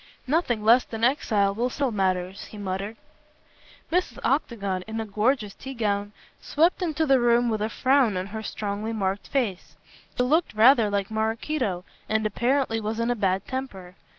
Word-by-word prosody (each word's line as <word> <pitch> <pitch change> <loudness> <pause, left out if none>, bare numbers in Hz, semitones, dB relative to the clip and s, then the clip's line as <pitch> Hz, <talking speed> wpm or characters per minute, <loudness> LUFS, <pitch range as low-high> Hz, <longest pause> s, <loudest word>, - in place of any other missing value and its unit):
"Nothing 255 -6 0
less 235 +3 +6
than 225 0 -7
exile 215 -6 +2
will 240 +4 -1
settle 270 0 -1
matters," 185 -2 -1
he 215 - -11
muttered. 200 +2 -4 0.9
Mrs. 355 -8 0
Octagon, 200 -9 -1
in 220 0 -4
a 225 - -2
gorgeous 215 +1 0
tea 265 0 -9
gown, 205 -3 -1 0.3
swept 335 +5 +2
into 320 -2 0
the 270 -3 +4
room 240 0 +3
with 215 -2 -1
a 215 - 0
frown 255 -5 +2
on 185 - -2
her 220 +3 -6
strongly 210 +1 -4
marked 195 -2 -2
face. 230 -10 -2 0.4
She 250 - +3
looked 310 +1 +1
rather 230 0 +6
like 200 0 -2
Maraquito, 220 -2 -1 0.2
and 220 0 +1
apparently 235 +2 0
was 220 +1 -3
in 230 +1 +1
a - - 0
bad 195 -3 0
temper. 200 -9 -6
220 Hz, 170 wpm, -25 LUFS, 200-255 Hz, 0.9 s, less